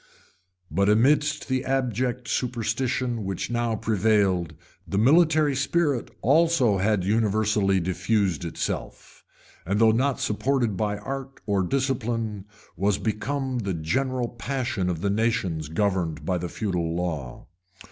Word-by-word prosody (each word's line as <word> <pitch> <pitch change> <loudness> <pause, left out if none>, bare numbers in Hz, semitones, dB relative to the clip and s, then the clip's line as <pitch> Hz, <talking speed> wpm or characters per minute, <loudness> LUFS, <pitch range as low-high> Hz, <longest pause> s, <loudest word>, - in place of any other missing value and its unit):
] - - -41 0.3
But 100 +1 +2
amidst 145 +7 +3
the 130 -1 0
abject 125 -1 -1
superstition 120 0 -1
which 95 +4 -3
now 120 -1 0
prevailed, 100 -6 +1 0.3
the 100 - -2
military 155 - +4
spirit 140 -1 0
also 140 - +3
had 100 -1 +1
universally 105 -1 +2
diffused 95 0 0
itself; 85 - -5 0.4
and 100 +4 -1
though 115 -1 +6
not 130 +3 +1
supported 120 0 0
by 105 +1 -1
art 135 +5 -6
or 100 -2 +1
discipline, 115 -3 -1 0.3
was 100 +1 +1
become 130 +4 -2
the 100 -5 -2
general 125 +10 -1
passion 120 -6 -2
of 85 -2 -3
the 100 0 +1
nations 95 -8 0
governed 90 -2 -1
by 90 -2 0
the 90 0 -4
feudal 85 -6 -2
law. 80 -8 -4
110 Hz, 125 wpm, -25 LUFS, 95-130 Hz, 0.4 s, though